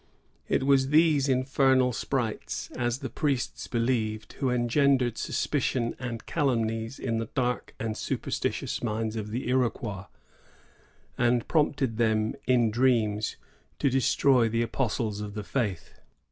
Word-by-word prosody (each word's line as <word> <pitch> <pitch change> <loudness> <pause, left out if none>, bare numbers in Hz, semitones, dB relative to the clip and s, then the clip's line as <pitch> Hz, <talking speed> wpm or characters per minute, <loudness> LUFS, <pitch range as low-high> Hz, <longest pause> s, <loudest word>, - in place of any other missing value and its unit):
'* - - -39
It - - -4
was 135 -1 +4
these 150 -2 +4
infernal 130 -1 +3
sprites, 120 -2 -3
as 120 -1 0
the - - -2
priests 140 -3 -2
believed, 115 -3 -1
who 135 - +1
engendered 125 0 +2
suspicions 125 -4 -1
and 120 -3 -5
calumnies 115 -5 -1
in 115 -3 -2
the 115 - -3
dark 125 -2 -1
and 110 -1 -2
superstitious - - -2
minds 110 -1 -2
of 105 -1 -4
the 120 +4 -3
Iroquois, 115 -6 -1 1.1
and 120 -1 +2
prompted 140 -7 +1
them 110 -2 +1
in 120 -3 +3
dreams 110 -3 +1 0.4
to 140 - +1
destroy 130 -2 +3
the 115 +1 +1
apostles 110 -4 -2
of 105 0 -6
the 105 - -4
Faith. 105 -6 -3
120 Hz, 130 wpm, -27 LUFS, 110-130 Hz, 1.1 s, was